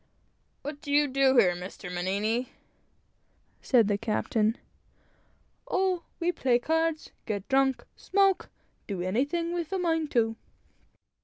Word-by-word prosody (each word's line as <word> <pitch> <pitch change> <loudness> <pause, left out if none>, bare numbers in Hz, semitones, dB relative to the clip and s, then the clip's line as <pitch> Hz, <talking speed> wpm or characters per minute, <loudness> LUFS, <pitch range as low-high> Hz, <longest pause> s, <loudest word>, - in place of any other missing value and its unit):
"What 290 0 -6
do 290 - -6
you 290 0 +4
do 265 -1 +3
here, 185 -7 +6
Mr. 180 0 -8
Mannini?" 205 +7 -1 1.1
said 235 -6 +4
the 205 -1 0
captain. 220 0 0 1.1
"Oh, 370 -2 +1 0.2
we 345 +1 +1
play 255 -8 +2
cards, 320 +4 -1 0.2
get 205 -3 -3
drunk, 270 -1 +2
smoke 390 -1 +1 0.4
do 190 -4 -3
anything 285 - 0
we're 340 -2 -2
a 385 - 0
mind 325 -4 0
to." 225 -2 +2
265 Hz, 125 wpm, -28 LUFS, 215-325 Hz, 1.1 s, here